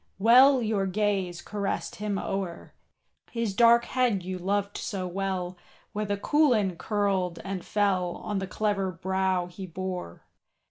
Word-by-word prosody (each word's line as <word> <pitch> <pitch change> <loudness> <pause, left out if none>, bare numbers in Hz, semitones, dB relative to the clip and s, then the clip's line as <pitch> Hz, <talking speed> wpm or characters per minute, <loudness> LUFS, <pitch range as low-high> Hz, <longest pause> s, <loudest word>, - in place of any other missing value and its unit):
Well 250 +5 +6
your 210 -3 0
gaze 190 -3 -1
caressed 200 -1 -3
him 205 -1 -2
o'er, 195 -4 -4 0.6
His 230 -4 -2
dark 235 +2 +5
head 245 -7 +1
you 185 0 -4
loved 200 +2 -1
so 190 -3 -3
well, 185 -1 -3 0.4
Where 210 +1 -2
the 205 0 -1
coulin 230 - +2
curled 195 -4 0
and 195 -2 -4
fell 190 -4 0
On 205 -2 -3
the 190 - -4
clever 195 -1 -1
brow 190 +1 0
he 180 +2 -8
bore. 180 - -5
195 Hz, 140 wpm, -27 LUFS, 185-210 Hz, 0.6 s, Well